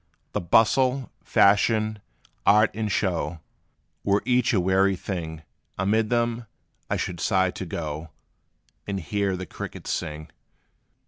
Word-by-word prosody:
The - - -2
bustle, 125 +8 +3
fashion, 110 +1 +3 0.4
art 105 +1 +5
and 110 0 -2
show 90 -3 -1 0.6
Were 100 0 +2
each 125 -1 +3
a 105 - +3
weary 95 +2 +3
thing; 80 -4 -5 0.3
Amid 105 +3 +1
them, 120 -1 0 0.4
I - - 0
should 85 -2 -3
sigh 95 -1 +2
to 95 - -6
go 80 0 -5 0.8
And 100 -1 -2
hear 95 +3 -1
the 95 - -5
crickets - - -7
sing. 75 0 -4
100 Hz, 125 wpm, -25 LUFS, 90-110 Hz, 0.8 s, art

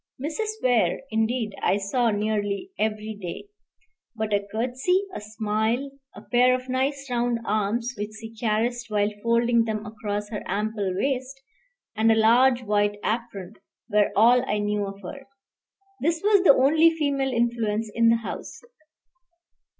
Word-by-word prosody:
Mrs. 330 +10 -3
Weir, 235 -9 +2
indeed, 220 0 0
I 195 - +2
saw 230 +5 0
nearly 210 - -2
every 215 0 -2
day; 180 - -7 0.7
but 220 -1 -2
a 200 0 0
curtsey, 255 - 0
a - - -6
smile, 220 +5 -2 0.2
a - - -11
pair 250 +1 +3
of 255 0 -6
nice 275 +2 -1
round 240 0 +1
arms 215 +4 -1
which 210 0 -5
she 225 0 -10
caressed 230 +2 -1
while 210 0 +1
folding 235 0 +2
them 215 -1 -3
across 210 -1 -4
her 210 - -5
ample 210 -2 -2
waist, 265 +3 -2 0.6
and 225 +1 +3
a - - +4
large 245 +3 +4
white 205 -1 +1
apron, 215 -4 -3 0.4
were 210 -1 +3
all 240 +4 +5
I 210 - +1
knew 205 -1 -1
of 195 0 -9
her. 270 +8 -9 0.7
This 330 +2 0
was 410 -2 +5
the 310 - +7
only 310 +5 +5
female 285 -4 -1
influence 230 -3 -1
in 230 0 +4
the 230 - +5
house. 230 - -7
225 Hz, 150 wpm, -25 LUFS, 210-255 Hz, 0.7 s, the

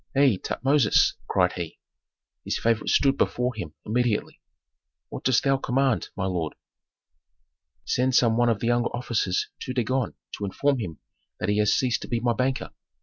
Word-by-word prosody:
Hei, 135 -7 +4
Tutmosis!" 135 +2 +2
cried - - +2
he. 85 -2 -6 0.7
His - - -2
favorite 115 -1 0
stood 135 -1 +3
before 125 0 0
him 85 -9 -7
immediately. 120 -1 -1 0.7
"What - - -7
dost 130 -2 +3
thou 135 -1 +3
command, 135 -1 0
my 95 - -2
lord?" 85 -4 -2 1.3
"Send 130 +1 +1
some 115 -3 +4
one 120 0 +3
of 110 -3 0
the - - -1
younger 120 0 +2
officers 115 -6 -1
to 130 - -5
Dagon 130 0 -1 0.2
to 100 - -2
inform 140 +7 0
him 85 -8 -5 0.4
that - - -2
he 105 +1 +2
has 105 -1 +3
ceased 125 -3 +1
to - - -7
be 120 - -1
my 120 0 +1
banker. 130 +2 -1
120 Hz, 165 wpm, -25 LUFS, 105-130 Hz, 1.3 s, Hei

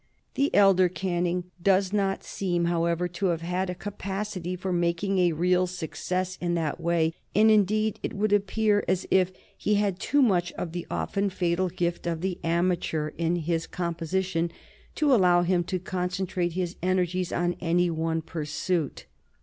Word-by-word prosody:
The 280 +1 +2
elder 195 -3 +6
Canning 180 -1 -2
does 195 +1 +3
not 195 -2 0
seem, 175 -3 -1
however, 170 +1 +1
to 190 +3 -1
have 170 -2 0
had 180 +2 -2
a 180 - -3
capacity 195 -2 -4
for 185 0 -3
making 175 +3 +1
a 175 -2 +3
real 180 +3 +2
success 180 +1 -3
in 175 -1 0
that 165 -1 -1
way, 165 -1 +1 0.2
and, 220 +2 +6
indeed, 215 +1 +2
it - - -4
would 205 +1 +1
appear 205 +1 +2
as 185 0 0
if 185 -1 +4 0.2
he 210 - 0
had 200 -3 0
too 285 +6 +3
much 175 -7 +2
of 170 - -5
the 175 0 -5
often 200 0 -1
fatal 180 0 0
gift 175 -1 -2
of 165 -1 -2
the 185 -1 -2
amateur 165 -2 0
in 165 +1 +1
his 165 -1 -1
composition 170 0 -2 0.4
to 295 -3 +3
allow 180 -6 +5
him 175 0 +2
to 185 - -1
concentrate 180 -1 -2
his 180 -1 -3
energies 185 0 0
on 175 0 0
any 175 0 +2
one 160 0 -1
pursuit. 155 0 -2
180 Hz, 165 wpm, -27 LUFS, 170-190 Hz, 0.4 s, elder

